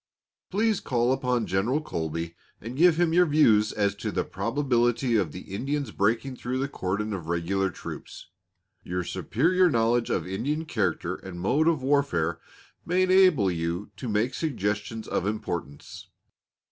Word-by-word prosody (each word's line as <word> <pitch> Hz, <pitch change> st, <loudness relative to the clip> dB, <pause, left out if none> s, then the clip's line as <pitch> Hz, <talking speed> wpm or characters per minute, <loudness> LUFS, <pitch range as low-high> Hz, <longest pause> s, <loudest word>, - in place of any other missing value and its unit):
Please 215 Hz, +1 st, +1 dB
call 120 Hz, 0 st, +1 dB
upon 125 Hz, -3 st, 0 dB
General 110 Hz, +10 st, +1 dB
Colby, 85 Hz, -, -4 dB, 0.3 s
and 115 Hz, +4 st, -7 dB
give 170 Hz, +2 st, +5 dB
him 170 Hz, -2 st, +2 dB
your 180 Hz, +1 st, +5 dB
views 115 Hz, -9 st, +4 dB
as 100 Hz, -2 st, +1 dB
to 100 Hz, -, -4 dB
the -, -, 0 dB
probability 120 Hz, -1 st, 0 dB
of 95 Hz, -8 st, +1 dB
the 90 Hz, -, -8 dB
Indians 140 Hz, +3 st, -2 dB
breaking 115 Hz, +7 st, 0 dB
through 125 Hz, +1 st, -3 dB
the 135 Hz, +1 st, -1 dB
cordon 105 Hz, -3 st, -3 dB
of 90 Hz, -5 st, -5 dB
regular 90 Hz, +3 st, 0 dB
troops; 85 Hz, -, -9 dB, 0.6 s
your 90 Hz, +1 st, -3 dB
superior 175 Hz, -, +2 dB
knowledge 115 Hz, -2 st, +2 dB
of -, -, 0 dB
Indian 135 Hz, -, -2 dB
character 105 Hz, -, -1 dB
and 90 Hz, -2 st, -9 dB
mode 140 Hz, -, +2 dB
of 160 Hz, -6 st, +2 dB
warfare, 110 Hz, -, +1 dB, 0.4 s
may 180 Hz, +2 st, +2 dB
enable 185 Hz, -, +5 dB
you 85 Hz, +3 st, -3 dB
to 125 Hz, -, -6 dB
make 110 Hz, +5 st, +1 dB
suggestions 105 Hz, -, -2 dB
of -, -, -1 dB
importance. 85 Hz, -8 st, -5 dB
115 Hz, 150 wpm, -26 LUFS, 95-145 Hz, 0.6 s, give